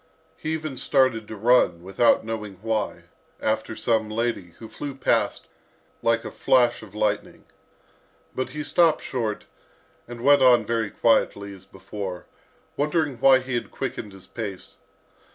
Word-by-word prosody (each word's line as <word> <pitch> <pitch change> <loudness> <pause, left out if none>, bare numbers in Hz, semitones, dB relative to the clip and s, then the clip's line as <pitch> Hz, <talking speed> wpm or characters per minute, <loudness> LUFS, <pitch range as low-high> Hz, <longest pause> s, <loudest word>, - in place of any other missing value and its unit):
He 155 - -4
even 155 -4 -4
started 130 -7 +2
to 110 - -7
run, 105 -6 +3
without 95 +5 +3
knowing 105 -3 -5
why, 110 -2 -2 0.4
after 110 0 -1
some 110 -2 0
lady, 110 -6 -2
who 115 - -10
flew 140 +4 -7
past 135 - 0 0.6
like 115 0 +1
a - - -5
flash 120 -2 +2
of 105 -2 -13
lightning. 105 -1 -1 0.9
But 130 - -3
he 150 0 -5
stopped 165 +2 +3
short, 115 -5 -3 0.6
and 120 0 -8
went 145 +1 +6
on 120 -3 +6
very 115 -1 -1
quietly 100 -3 +1
as 95 -1 -15
before, 95 -2 -7 0.5
wondering 150 -2 0
why 130 0 +6
he 130 0 -6
had 120 - -2
quickened 105 - -5
his 95 -1 -13
pace. 100 -5 -7
115 Hz, 145 wpm, -24 LUFS, 105-130 Hz, 0.9 s, went